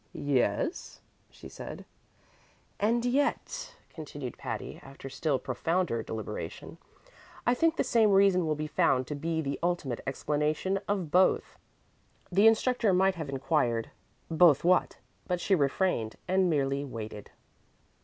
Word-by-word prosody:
"Yes?" 145 - -1 0.3
she - - -12
said. - - -9 0.9
"And 235 +4 +1
yet," 290 - -1 0.2
continued 145 -6 -7
Patty, - - -6
after 135 0 -10
still 140 0 0
profounder 130 +1 -1
deliberation, 110 -1 -6 0.7
"I 240 - +4
think 325 +6 +2
the - - +1
same 230 -4 +3
reason 195 -3 +4
will 155 - +1
be 155 +1 -3
found 135 -3 +2
to 150 - -5
be 160 +2 -2
the 140 -2 -3
ultimate 170 -8 -1
explanation 150 +7 -1
of 190 -7 -2
both." 185 +1 +2 0.7
The 200 +4 +5
instructor 225 -2 +3
might 190 +1 +3
have 160 -5 -6
inquired, 130 -4 0 0.4
"Both 160 -3 +5
what?" 180 +1 +2 0.3
but 180 -1 -1
she 195 - 0
refrained 140 - +1
and 185 0 +2
merely 140 -2 0
waited. 110 -6 -7
160 Hz, 130 wpm, -29 LUFS, 140-195 Hz, 0.9 s, The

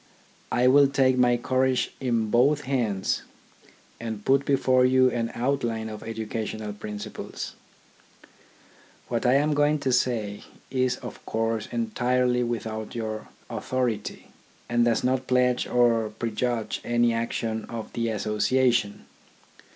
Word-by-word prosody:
I 125 - +2
will 140 +2 +7
take 135 -1 +3
my 125 -1 +4
courage 130 +1 +1
in 115 -4 0
both 140 +5 +4
hands, 120 -8 -1 0.8
and 110 -3 -5
put 140 +1 +3
before 130 -2 +3
you 130 0 +4
an 115 -1 -1
outline 120 -3 -1
of 105 -1 -7
educational 110 -1 -4
principles. 105 0 -6 1.6
What 120 +1 0
I 125 - +5
am 150 +2 +3
going 145 +1 +3
to 135 - 0
say 115 -5 0 0.3
is 130 -1 +1
of - - -8
course 115 -1 -1
entirely 125 - +1
without 110 -2 -3
your 110 -2 -4 0.2
authority, 125 -5 -3 0.4
and 120 0 +2
does 115 -2 +2
not 130 0 0
pledge 125 -1 +2
or 115 -3 +3
prejudge 115 +1 -2
any 120 0 +2
action 115 -1 -2
of 115 -2 -7
the 115 -1 -1
Association. 110 +1 +1
120 Hz, 125 wpm, -26 LUFS, 110-130 Hz, 1.6 s, will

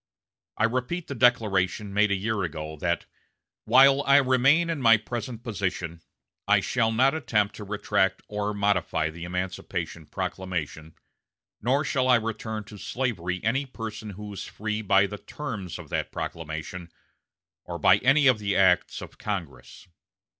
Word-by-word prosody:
I - - +1
repeat 130 +9 -1
the - - -5
declaration 105 -5 +2
made 105 +1 +3
a 100 - +2
year 105 +1 -1
ago, 80 -3 -4
that 85 +2 -1 0.6
'While 135 +1 +6
I 140 0 +5
remain 135 +5 +4
in 155 -4 -3
my 115 -2 +7
present 115 +1 -6
position 90 -7 -3 0.5
I - - +5
shall 115 -3 +1
not 130 +5 +3
attempt 105 -10 0
to 105 - -7
retract 100 -1 0
or 105 0 -2
modify 100 -6 +1
the 85 +1 -8
emancipation 90 -3 -4
proclamation, 80 -4 -4 0.7
nor 135 +4 +2
shall 130 -2 +1
I 125 - +6
return 110 -1 -3
to 105 0 -12
slavery 95 -10 -3
any 135 +6 0
person 110 -3 -7
who 105 +1 -8
is 95 - -6
free 105 0 -4
by 100 -1 +4
the 105 +1 -6
terms 110 - -6
of - - -11
that - - -2
proclamation, 80 +2 -6 0.7
or - - -6
by - - +5
any 140 +3 +4
of 130 -5 +5
the 100 -1 -1
acts 95 -2 +3
of - - -12
Congress.' 85 -13 -6
105 Hz, 155 wpm, -26 LUFS, 95-125 Hz, 0.7 s, my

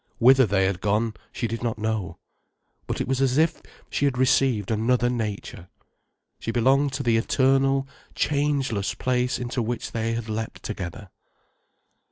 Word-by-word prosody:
Whither 130 +1 +6
they 95 -1 +2
had 95 -1 -1
gone, 105 +2 +1 0.2
she 120 - -3
did 115 +1 -4
not 115 -2 -2
know. 105 -5 -2 0.7
But - - -3
it - - -2
was 135 0 0
as 135 0 +2
if 160 +1 +2 0.3
she 145 - +1
had 135 -3 +1
received 125 -5 +2
another 120 +3 +2
nature. 105 -6 -4 0.7
She - - -5
belonged 135 +5 +3
to 135 +1 -2
the 115 -2 +3
eternal, 135 +3 +2 0.3
changeless 140 -8 0
place 125 -1 0
into 125 0 -3
which 120 +1 -3
they 115 0 -1
had 115 -1 -4
leapt 110 0 -5
together. 95 -1 -6
120 Hz, 155 wpm, -25 LUFS, 110-135 Hz, 0.7 s, Whither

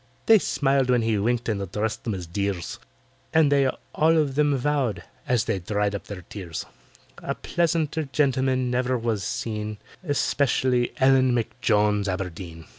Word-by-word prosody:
They 225 -1 +7
smiled 135 -6 +1
when 125 -2 +3
he 110 -2 +1
winked 120 +3 0
and 105 -3 -1
addressed 105 +3 -3
them 110 -4 -1
as 90 -2 -6
"dears," 95 0 -3 0.6
And 155 -3 +5
they 140 -1 +4 0.3
all 160 +1 +3
of 145 -4 +1
them 145 0 +2
vowed, 135 -4 0 0.2
as 120 -4 +2
they 95 - -1
dried 105 +2 -1
up 100 - -5
their 95 -3 -7
tears, 90 -3 -6 0.6
A - - -3
pleasanter 160 -2 0
gentleman 130 -3 +1
never 125 +1 +1
was 115 -4 -1
seen— 105 0 -3 0.3
Especially 130 -5 +1
ELLEN 130 -2 +4
M'JONES 105 -3 +1
ABERDEEN. 90 -3 -5
120 Hz, 150 wpm, -25 LUFS, 100-135 Hz, 0.6 s, They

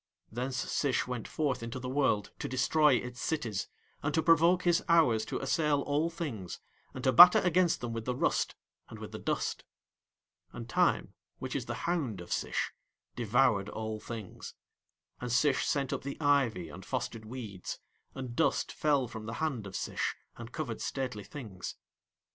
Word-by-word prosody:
Thence 125 +3 -3
Sish 135 +1 0
went 125 -3 -4
forth 140 -6 -1
into 115 +2 -5
the 130 0 -5
world 130 -6 +1
to - - -3
destroy 145 +3 +4
its 125 0 -4
cities, 120 -11 -2 0.3
and 145 - 0
to 160 - +2
provoke 170 +3 +5
his 175 -1 +3
hours 130 -10 +5
to - - -3
assail 145 +1 +1
all 150 +4 +1
things, 140 - -5 0.4
and 130 - -6
to 130 - +4
batter 175 +8 +10
against 180 -1 +2
them 120 -1 -3
with 115 -1 -4
the 125 - -1
rust - - +1 0.3
and - - -9
with - - -8
the - - -6
dust. - - -2 0.9
And 115 -1 -7
Time, - - +2 0.2
which - - -5
is - - -2
the - - -4
hound 150 - -1
of 85 - -4
Sish, - - -1 0.4
devoured 110 -3 +2
all 110 0 -4
things; 110 -3 -8 0.6
and 125 -1 -4
Sish 130 +3 +3
sent 140 -2 0
up - - -2
the 140 +1 -6
ivy 135 - +2
and 90 - -10
fostered 115 -1 -4
weeds, 110 -6 -6 0.4
and 130 -3 -6
dust 160 - +1
fell 145 -4 +1
from 110 -1 -8
the 115 - -4
hand 130 -8 -2
of 95 - -9
Sish - - -2 0.2
and - - -9
covered - - -4
stately 125 -6 -3
things. 105 -8 -7
125 Hz, 170 wpm, -31 LUFS, 115-150 Hz, 0.9 s, batter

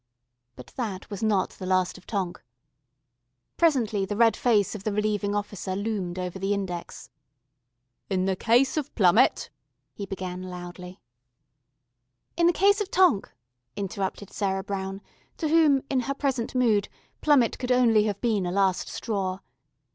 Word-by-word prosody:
But 125 - -13
that 210 -6 -4
was 200 - -5
not 210 -4 +1
the 185 - -8
last 185 -1 +1
of 190 - -15
Tonk. 195 -5 -3 1.1
Presently 240 -12 +2
the 205 +1 -3
red 230 -1 +5
face 215 -6 +2
of 210 -3 -7
the 215 - -1
Relieving 205 -1 0
Officer 205 -2 -3
loomed 200 -4 -3
over 180 0 -4
the 195 +2 0
index. 180 -3 -6 1.0
"In 185 -1 0
the 190 -1 +1
case 240 +9 +2
of 295 -2 -2
Plummett - - +3 0.2
" - - -52
he 200 - -6
began 185 -1 -5
loudly. 180 0 -8 1.4
"In 340 0 +3
the - - +6
case 405 +3 +3
of 405 - -3
Tonk 355 - +3 0.2
" 125 0 -53
interrupted 195 0 -4
Sarah 195 -2 -1
Brown, 195 0 -4 0.4
to 315 - -1
whom, 305 -4 +4
in 270 - +1
her 275 +3 -2
present 265 -4 -2
mood, 225 -5 +2 0.3
Plummett 280 -7 +3
could 255 0 -2
only 230 -4 +4
have 205 -2 -2
been 215 -6 +1
a - - -2
last 190 -1 +1
straw. 195 -4 -3
205 Hz, 155 wpm, -26 LUFS, 190-245 Hz, 1.4 s, the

